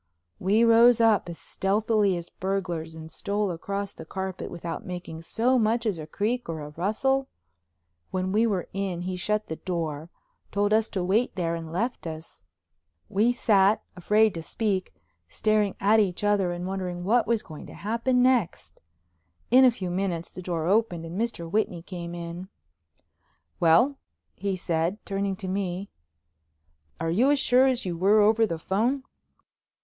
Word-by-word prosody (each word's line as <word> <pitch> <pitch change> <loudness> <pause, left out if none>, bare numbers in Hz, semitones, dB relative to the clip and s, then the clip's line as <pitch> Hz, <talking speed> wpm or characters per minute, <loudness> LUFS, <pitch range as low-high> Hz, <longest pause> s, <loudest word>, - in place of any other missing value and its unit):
We 210 +5 +3
rose 235 +1 +6
up 225 -5 +3
as 170 - -7
stealthily 205 -1 +1
as 170 0 -8
burglars 180 -4 -3
and 160 0 -10
stole 205 +1 -1
across 200 +4 -4
the - - -10
carpet 190 +2 -5
without 170 -1 -6
making 175 -3 -7
so 240 +9 +1
much 230 +2 +1
as 200 -7 -1
a 155 - -7
creak 220 +6 -2
or 160 -2 -4
a 145 - -7
rustle. 240 - 0 0.8
When 185 0 -2
we 220 +3 +3
were 190 -5 -1
in 190 -3 -2
he 185 +1 -3
shut 210 +4 -1
the 160 - -6
door, 165 -3 -4 0.4
told 205 +1 +1
us 220 0 +3
to 185 - -2
wait 210 +7 +1
there, 170 -3 -1
and 165 -1 -5
left 225 +2 -2
us. 160 0 -8 0.7
We 220 +5 +3
sat, 210 -4 +3
afraid 210 +4 +3
to 165 - -5
speak, 195 +2 -2 0.4
staring 215 -2 +1
at 210 +3 +4
each 195 -2 0
other 205 -3 +2
and 175 0 -4
wondering 185 -2 -4
what 230 +5 +2
was 230 -1 +1
going 155 -2 -10
to - - -11
happen 235 +4 +1
next. 250 -8 0 0.7
In 255 +2 +7
a - - +8
few 190 -7 -4
minutes 175 -2 -2
the 185 - -8
door 170 -3 -2
opened 185 -3 +1
and 175 +6 -4
Mr. 225 -8 -3
Whitney 180 -2 -1
came 175 -2 -7
in. 170 +2 -7 1.1
"Well?" 180 - +4 0.3
he 195 0 -2
said, 170 +1 -1
turning 195 -1 -1
to 190 - -7
me, 190 0 -3 1.1
"are 165 0 -1
you 235 +11 +3
as 290 - +4
sure 260 -1 +4
as 255 -3 0
you 175 -2 -2
were 195 +5 +4
over 220 +2 +4
the 165 - -3
phone?" 230 +11 0
195 Hz, 165 wpm, -26 LUFS, 175-220 Hz, 1.1 s, a